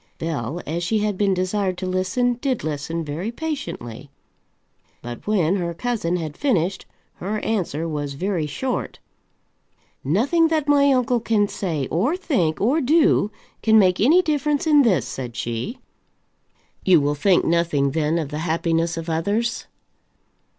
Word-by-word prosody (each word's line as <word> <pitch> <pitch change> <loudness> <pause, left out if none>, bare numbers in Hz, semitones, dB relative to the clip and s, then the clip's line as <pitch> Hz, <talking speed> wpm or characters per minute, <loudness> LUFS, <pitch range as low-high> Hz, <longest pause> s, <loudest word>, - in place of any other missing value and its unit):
Bell, 160 -1 -3
as 170 +3 -3
she 215 +6 +1
had 210 -1 0
been 195 0 +1
desired 185 0 -1
to 185 - -4
listen, 190 +7 0
did 265 -4 -1
listen 155 +2 -3
very 165 +9 -4
patiently. 235 - -5 0.9
But 120 +7 -8
when 195 -3 +2
her 170 -2 -3
cousin 220 -6 -1
had 160 -4 -4
finished, 195 - 0 0.3
her 205 +4 -3
answer 170 -7 -1
was 145 -3 -4
very 175 -1 -1
short. 255 - -3 1.1
"Nothing 260 - +2
that 310 -2 0
my 280 -1 +5
uncle 250 -2 +2
can 215 -2 +1
say, 160 -10 -3
or 240 - +1
think, 185 - 0
or 265 +10 +2
do, 295 -6 +3 0.3
can 220 0 +5
make 185 -3 +4
any 325 - +5
difference 300 -2 0
in 300 -2 +6
this," 225 -9 +2
said 125 -3 -6
she. 120 - -4 1.1
"You 180 -4 +5
will 145 0 +1
think 175 +5 +2
nothing, 165 -5 +1
then, 155 +2 0
of 155 -4 -2
the 150 +1 -4
happiness 165 0 0
of 165 0 -5
others." 205 +8 -1
185 Hz, 150 wpm, -22 LUFS, 160-240 Hz, 1.1 s, in